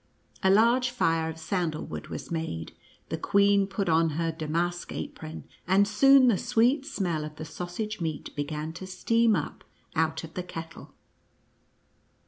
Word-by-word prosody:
A 190 - +3
large 235 +5 +4
fire 165 -9 +1
of 160 - -7
sandal 165 -2 -2
wood - - -7
was - - -7
made, 120 - -3 0.4
the - - -3
queen 200 0 +3
put 195 0 -2
on 165 0 +3
her 165 -1 0
damask 170 +3 -2
apron, 160 0 -6 0.2
and 195 +2 +4
soon 265 +5 +6
the 220 -6 +3
sweet 250 +4 +2
smell 175 - -1
of 150 0 -7
the 155 - -7
sausage 180 +6 -5
meat 160 -3 -4
began 150 +2 -3
to 185 +2 -8
steam 225 +4 +2
up 150 - -4 0.3
out 160 0 0
of 165 0 -9
the 180 - -3
kettle. 165 -2 -9
175 Hz, 155 wpm, -28 LUFS, 160-205 Hz, 0.4 s, soon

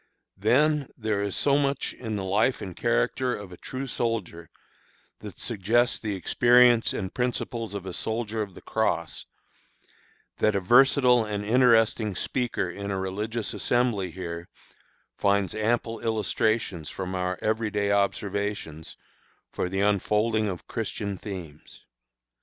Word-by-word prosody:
Then 145 +7 +3
there 110 -3 -1
is 100 -2 -2
so 140 0 +3
much 140 -1 -1
in 110 -3 -5
the 100 - -3
life 105 +7 +1
and 95 -3 -7
character 125 - +1
of 105 -3 -9
a 90 - -10
true 130 +1 -5
soldier 110 - -3 0.7
that - - -9
suggests 115 +3 +1
the 105 -3 -3
experience 120 +4 +5
and 95 0 -4
principles 120 -3 -2
of 100 -2 -5
a 95 - -5
soldier 110 +1 -2
of 100 -4 -5
the - - -12
Cross, 85 -7 -1 1.1
that 110 -1 +2
a - - +3
versatile 125 +3 +5
and 105 -1 -3
interesting 115 -3 +3
speaker 120 0 -1
in 100 +3 -6
a 95 -1 -1
religions 105 +4 -3
assembly 120 -7 +1
here 85 -1 -6 0.7
finds 100 -2 +2
ample 115 +1 -1
illustrations 110 -5 -1
from 95 -1 -5
our 90 0 -1
every 110 0 0
day 100 -1 0
observations 100 -5 -2 0.5
for 90 - -2
the 95 +1 -1
unfolding 105 +2 +2
of 90 -2 -6
Christian 105 -3 -3
themes. 90 -7 -9
105 Hz, 135 wpm, -26 LUFS, 95-115 Hz, 1.1 s, experience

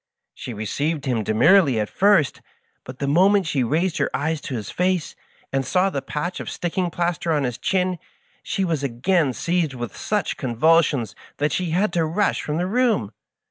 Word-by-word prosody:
She - - -7
received 140 +8 -2
him 125 -4 0
demurely 130 - +4
at 105 - -1
first, 195 - +2 0.4
but 130 0 -9
the 140 - -3
moment 190 +6 +4
she 145 -5 0
raised 160 +8 0
her - - +1
eyes 155 +2 -1
to 130 - -5
his 105 -4 -5
face, 180 -2 -1 0.4
and 135 0 +1
saw 180 +9 +1
the 140 - -2
patch 170 +7 -4
of - - -5
sticking 175 +1 -2
plaster 170 0 -1
on 150 -3 +1
his 125 -1 -3
chin, 185 +2 0 0.4
she 195 - -2
was 165 -5 -1
again 140 +4 +1
seized 170 +1 -1
with 120 -3 -6
such 210 -5 -2
convulsions 140 - +2 0.2
that 145 +1 0
she 180 +2 -1
had 180 +3 +1
to 170 - +2
rush 170 +6 0
from 150 +1 -3
the 175 - 0
room. 220 - +1
160 Hz, 180 wpm, -22 LUFS, 130-180 Hz, 0.4 s, demurely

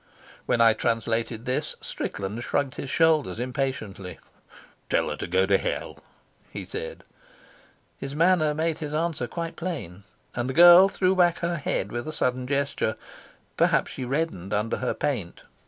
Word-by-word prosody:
When 120 - +2
I 115 -1 +7
translated 115 0 -1
this, 125 - -1
Strickland 105 +5 -4
shrugged 130 +3 -1
his 135 - -6
shoulders 155 - +2
impatiently. 125 -7 -4 0.7
"Tell - - +1
her - - -2
to - - -4
go 95 +2 +2
to 95 0 +3
hell," - - -4 0.5
he - - -7
said. - - -6 1.0
His 135 +1 -6
manner 160 -2 +3
made 160 0 -1
his 150 -1 -4
answer 160 -6 -1
quite 170 +3 -5
plain, 150 - -5 0.3
and 120 +2 -2
the 130 - -4
girl 175 +3 +9
threw 185 -1 +1
back 175 -2 +4
her 170 0 -1
head 105 -8 -2
with 120 +2 -4
a 155 - -4
sudden 125 -3 -1
gesture. 140 -5 0 0.6
Perhaps - - +2
she - - -5
reddened 125 - -2
under 105 +2 -1
her 130 - -2
paint. 110 -12 -3
130 Hz, 155 wpm, -26 LUFS, 115-160 Hz, 1.0 s, girl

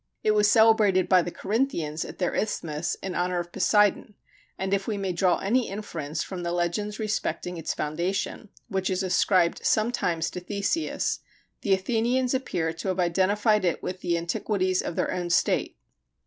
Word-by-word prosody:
It 215 - +3
was 210 -1 +4
celebrated 215 -4 +5
by 185 -1 +5
the 175 - -3
Corinthians 190 - -1
at - - -9
their 180 - -1
isthmus, 165 -6 -2
in 190 -1 -3
honor 180 0 0
of 175 0 -4
Poseidon, 205 +2 +2 0.4
and 190 +1 -2
if 195 -1 0
we 215 -3 -1
may 195 -2 -2
draw 180 0 +2
any 235 +5 +1
inference 170 -7 -4
from 185 -2 -6
the 170 0 -2
legends 175 +5 -1
respecting 190 -5 -2
its 165 - -3
foundation, 175 +7 -2 0.2
which 190 -3 -1
is 190 0 0
ascribed 185 -1 +2
sometimes 180 -7 +1
to - - -5
Theseus, 205 - -1 0.4
the 200 - +2
Athenians 240 +6 0
appear 170 -11 -1
to 165 +4 -6
have 185 0 -1
identified 200 +4 +2
it 175 -2 0
with 185 0 -4
the 170 -1 0
antiquities 185 +3 0
of 170 - -5
their - - 0
own 175 -1 -3
state. 170 - +1
190 Hz, 170 wpm, -26 LUFS, 175-210 Hz, 0.4 s, celebrated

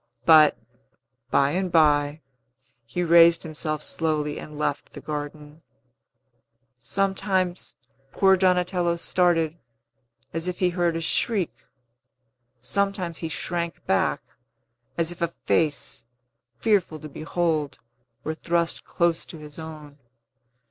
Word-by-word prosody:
But, 155 -2 +7 0.7
by 140 +1 +3
and 185 +2 -1
by, 150 -2 +3 0.7
he 175 +10 -2
raised 170 0 +6
himself 155 -1 -4
slowly 150 -2 0
and 150 -1 -9
left 145 -1 -2
the - - -8
garden. 150 +1 -7 1.2
Sometimes 190 - -1 0.4
poor 190 -1 +4
Donatello 180 -2 +2
started, 170 -2 +1 0.7
as 165 +1 -3
if 180 - -3
he 180 - +2
heard 175 -1 0
a 165 - -2
shriek; 195 +2 0 1.1
sometimes 185 - -1
he 165 - -4
shrank 170 0 -3
back, 95 - +1 0.7
as 170 0 0
if 175 - -10
a 170 0 -1
face, 150 -6 0 0.5
fearful 200 -8 +1
to 155 - -8
behold, 155 -1 -2 0.5
were 155 - -2
thrust 170 +1 -1
close 170 -1 0
to 165 - -9
his 150 0 -10
own. 155 -2 -10
165 Hz, 115 wpm, -25 LUFS, 150-175 Hz, 1.2 s, But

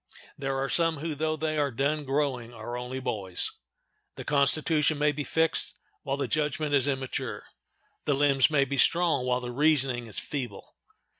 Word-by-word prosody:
There 135 -1 -2
are 135 0 -1
some 165 +3 +2
who, 155 +2 -3
though 155 +2 -1
they 155 0 -1
are 145 -1 +2
done 140 +4 -1
growing, 135 -4 -1
are 120 +1 -7
only 125 +2 -4
boys. 105 -8 -1 0.6
The - - -7
constitution 150 +2 +2
may 150 0 +3
be 145 +1 -4
fixed 160 +2 0 0.3
while 135 0 -2
the 140 - -1
judgment 150 -1 -1
is 140 -1 +3
immature; 135 -2 -3 0.6
the 145 - +2
limbs 140 -1 +4
may 140 -3 +3
be 140 +1 -3
strong 165 -2 +3
while 125 0 +1
the 125 0 -5
reasoning 135 -3 +2
is 110 - -6
feeble. 135 -5 -5
140 Hz, 170 wpm, -28 LUFS, 130-150 Hz, 0.6 s, limbs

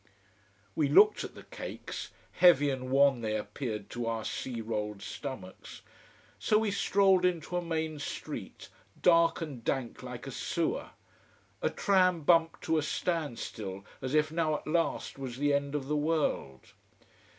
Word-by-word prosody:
We 145 -3 +2
looked 420 - +6
at - - -8
the - - -11
cakes - - -7 0.2
heavy 145 -6 +5
and 130 -1 -4
wan 135 -2 +4
they 110 -1 -1
appeared 105 0 -5
to 120 -1 -3
our 115 -1 -2
sea 125 -3 -4
rolled 105 -2 -3
stomachs. 130 -10 -8 0.6
So 215 - +3
we 215 -1 +1
strolled 195 -2 +3
into 180 -1 0
a 175 - +1
main 160 -2 -2
street, 145 - -6 0.3
dark 165 -1 +4
and 140 -8 -6
dank 130 -2 -2
like - - -7
a - - -6
sewer. - - -2 0.7
A - - +2
tram 185 -4 +3
bumped 165 +1 +3
to 160 -1 +2
a - - 0
standstill, 120 - -3 0.2
as 130 +2 -2
if 155 0 +3
now 160 -2 +1
at - - -6
last 165 -3 -1
was 130 -3 -5
the 145 +1 +2
end 140 0 0
of 135 -2 -2
the 150 - 0
world. 150 - -1
145 Hz, 155 wpm, -30 LUFS, 120-165 Hz, 0.7 s, looked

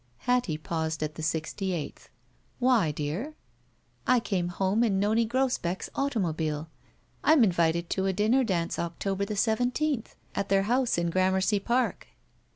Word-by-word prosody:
Hattie, 245 -11 +1
pausing 160 0 -3
at 150 - -6
the 160 - -8
sixty 160 +4 -2
eighth, 160 -4 -6 0.5
"Why, 245 -9 +3
dear?" 155 - -4 0.7
I 250 -1 +5
came 190 -6 -1
home 190 +5 +1
in 200 -5 +2
Nonie 220 +3 +2
Grosbeck's 245 -8 -1
automobile. 165 - -1 0.5
I'm 310 -5 +6
invited 170 -3 +2
to 190 0 0
a - - +2
dinner 215 +7 +2
dance 175 -7 -1
October 195 +4 -2
the 210 - -4
seven 225 +4 +2
teenth. 285 -3 -2 0.2
At 200 - -2
their 195 0 +3
house 245 +2 +1
in 170 0 0
Gramercy 190 +3 +2
Park." 245 +5 0
195 Hz, 150 wpm, -28 LUFS, 170-235 Hz, 0.7 s, I'm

